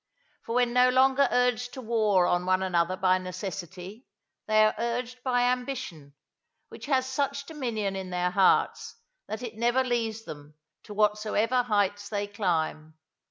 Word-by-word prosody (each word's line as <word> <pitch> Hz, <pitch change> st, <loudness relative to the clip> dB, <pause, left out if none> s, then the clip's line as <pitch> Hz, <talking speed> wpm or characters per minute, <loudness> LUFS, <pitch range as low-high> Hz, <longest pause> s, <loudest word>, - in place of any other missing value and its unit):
For 230 Hz, -, -3 dB
when 245 Hz, -1 st, +2 dB
no 250 Hz, 0 st, +5 dB
longer 265 Hz, +1 st, +4 dB
urged 245 Hz, 0 st, +1 dB
to 260 Hz, -, -6 dB
war 215 Hz, -5 st, +2 dB
on 175 Hz, +1 st, 0 dB
one 185 Hz, 0 st, +2 dB
another 180 Hz, 0 st, 0 dB
by 185 Hz, 0 st, +2 dB
necessity, 185 Hz, +3 st, -7 dB, 0.4 s
they 215 Hz, 0 st, +5 dB
are 215 Hz, -, +2 dB
urged 245 Hz, +2 st, -3 dB
by 245 Hz, -1 st, +1 dB
ambition, 245 Hz, -, -3 dB, 0.5 s
which -, -, -10 dB
has 265 Hz, -3 st, +2 dB
such 280 Hz, +1 st, -2 dB
dominion 235 Hz, -10 st, -3 dB
in 190 Hz, -1 st, -5 dB
their 180 Hz, 0 st, -1 dB
hearts 195 Hz, -1 st, +2 dB, 0.3 s
that 220 Hz, +3 st, -5 dB
it 230 Hz, -3 st, -7 dB
never 240 Hz, +3 st, +2 dB
leaves 225 Hz, -3 st, -2 dB
them 145 Hz, 0 st, -10 dB, 0.3 s
to 210 Hz, -, -9 dB
whatsoever 215 Hz, +3 st, +1 dB
heights 205 Hz, -3 st, 0 dB
they 205 Hz, -1 st, -2 dB
climb. 160 Hz, -6 st, -2 dB
215 Hz, 155 wpm, -27 LUFS, 185-250 Hz, 0.5 s, no